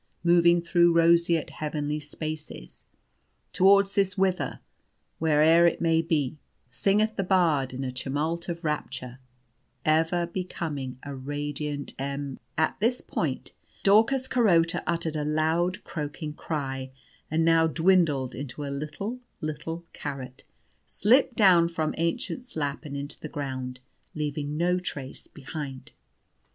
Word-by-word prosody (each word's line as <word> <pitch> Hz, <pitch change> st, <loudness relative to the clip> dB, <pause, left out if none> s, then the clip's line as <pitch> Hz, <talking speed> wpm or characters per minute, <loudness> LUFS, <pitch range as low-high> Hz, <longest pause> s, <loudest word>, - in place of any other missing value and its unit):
Moving 170 Hz, 0 st, +5 dB
through 170 Hz, 0 st, +4 dB
roseate 170 Hz, -1 st, +4 dB
heavenly 150 Hz, -1 st, -3 dB
spaces, 150 Hz, -, -7 dB, 0.7 s
Towards 195 Hz, +1 st, +5 dB
this 195 Hz, 0 st, +1 dB
'Whither,' 190 Hz, -1 st, 0 dB, 0.6 s
where'er 160 Hz, +2 st, +5 dB
it 170 Hz, -, 0 dB
may 165 Hz, -1 st, +3 dB
be, 155 Hz, -3 st, -1 dB, 0.3 s
Singeth 205 Hz, -, +1 dB
the 195 Hz, -, +1 dB
bard, 165 Hz, -8 st, +2 dB
in 130 Hz, +1 st, -5 dB
a 130 Hz, -, -2 dB
tumult 150 Hz, +7 st, -2 dB
of 170 Hz, 0 st, -4 dB
rapture, 130 Hz, -5 st, -4 dB, 0.7 s
Ever 165 Hz, +3 st, +2 dB
becoming 160 Hz, -7 st, -4 dB
a 145 Hz, -, -6 dB
radiant 145 Hz, +1 st, -4 dB
em 140 Hz, 0 st, -4 dB
" -, -, -43 dB
At -, -, -17 dB
this 235 Hz, +4 st, +1 dB
point, -, -, -3 dB, 0.3 s
Daucus 230 Hz, +6 st, +4 dB
Carota 175 Hz, -11 st, +3 dB
uttered 165 Hz, -2 st, -1 dB
a 150 Hz, -, -1 dB
loud 160 Hz, +4 st, 0 dB
croaking 150 Hz, 0 st, -5 dB
cry, 135 Hz, -4 st, -4 dB, 0.4 s
and, 160 Hz, +1 st, +1 dB
now 165 Hz, -1 st, +5 dB
dwindled 160 Hz, -6 st, +2 dB
into 140 Hz, +2 st, -6 dB
a 140 Hz, -, -4 dB
little, 155 Hz, -, -5 dB, 0.2 s
little 165 Hz, +2 st, -5 dB
carrot, 130 Hz, -3 st, -7 dB, 0.4 s
slipped 240 Hz, +4 st, +3 dB
down 180 Hz, -5 st, +6 dB
from 160 Hz, -2 st, -2 dB
Aennchen's 240 Hz, +8 st, -3 dB
lap, 145 Hz, 0 st, -2 dB
and 140 Hz, -1 st, -5 dB
into 140 Hz, +2 st, -6 dB
the 155 Hz, -, -7 dB
ground, 130 Hz, -3 st, -5 dB, 0.3 s
leaving 150 Hz, -1 st, -3 dB
no 180 Hz, +2 st, +2 dB
trace 140 Hz, -7 st, -6 dB
behind. 135 Hz, 0 st, -7 dB
160 Hz, 130 wpm, -27 LUFS, 145-175 Hz, 0.7 s, down